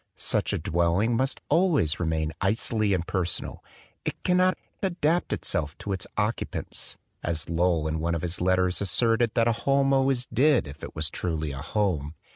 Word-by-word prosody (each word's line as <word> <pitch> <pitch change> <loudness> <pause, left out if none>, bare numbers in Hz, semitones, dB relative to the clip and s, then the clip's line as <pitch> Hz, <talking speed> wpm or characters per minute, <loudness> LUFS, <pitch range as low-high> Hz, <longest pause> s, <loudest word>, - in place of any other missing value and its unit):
Such - - 0
a - - 0
dwelling 85 +8 +1
must 130 +3 -1
always 150 - +2
re 85 - -1
main 80 -1 -1
icily 105 +1 +1
impersonal; 90 0 -2 0.4
it - - -4
cannot 185 +1 +3 0.2
"adapt 175 -3 +1 0.4
to 100 - -5
its 95 - -4
occupants" 110 +2 -3 0.2
as 80 -2 -1
Lowell 85 -1 +1
in 80 +1 -2
one 85 +1 0
of 85 - -4
his 90 0 -2
let 95 +1 +3
:;sMTtr<l 105 +5 +2
that 115 0 +3
a 115 +3 -1
noun 135 0 +3
always 135 -2 +2
did, 130 - +3
if 70 +1 -10
it: - - -7 0.3
ruly 80 -4 -1
a 70 - -6
home. 85 -7 -1
95 Hz, 160 wpm, -26 LUFS, 85-125 Hz, 0.4 s, cannot